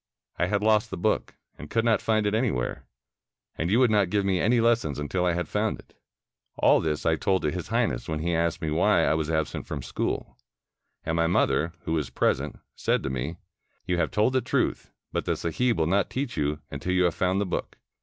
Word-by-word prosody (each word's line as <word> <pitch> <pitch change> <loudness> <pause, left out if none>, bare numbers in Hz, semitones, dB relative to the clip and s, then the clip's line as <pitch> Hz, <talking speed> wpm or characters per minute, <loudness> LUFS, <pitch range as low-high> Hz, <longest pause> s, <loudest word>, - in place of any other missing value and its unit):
I 90 - +2
had 100 +1 0
lost 110 -1 +3
the - - -5
book, - - 0 0.2
and 75 - -9
could 115 0 +1
not 115 -2 +3
find 110 -1 +1
it 105 - +1
anywhere, 110 - -1 0.7
and 85 - -2
you 105 - +3
would 125 -3 +4
not 100 -4 +3
give 100 0 +1
me 95 -2 +1
any 120 +3 +3
lessons 115 - +2
until 90 +5 -1
I 90 - +2
had 90 0 -2
found 105 +1 -1
it. - - -18 0.6
All - - +5
this 75 -2 -2
I 80 -1 +3
told 95 +3 0
to 75 - +1
His - - -5
Highness, - - 0
when 80 - -1
he 85 +3 -1
asked 85 0 0
me 80 - -1
why 85 +1 +3
I - - +3
was 80 -1 -1
absent 80 -2 -2
from 70 -4 -5
school. 60 - -3 0.7
And 80 - -1
my 85 0 +2
mother, 80 -1 +1
who 80 - -3
was 75 -6 -1
present, - - 0 0.2
said - - 0
to 70 - -2
me, 70 +6 -3 0.5
'You 90 -2 0
have 85 - +1
told 110 +4 +2
the 130 - +2
truth, 125 - -1 0.2
but - - -2
the - - 0
sahib 115 +9 0
will 80 - +2
not 95 +4 +1
teach 130 -1 -3
you, 75 0 0
until 80 +6 -3
you 90 0 +3
have 90 - +2
found 95 +1 +1
the 100 - 0
book. 90 - -4
90 Hz, 225 wpm, -26 LUFS, 80-105 Hz, 0.7 s, All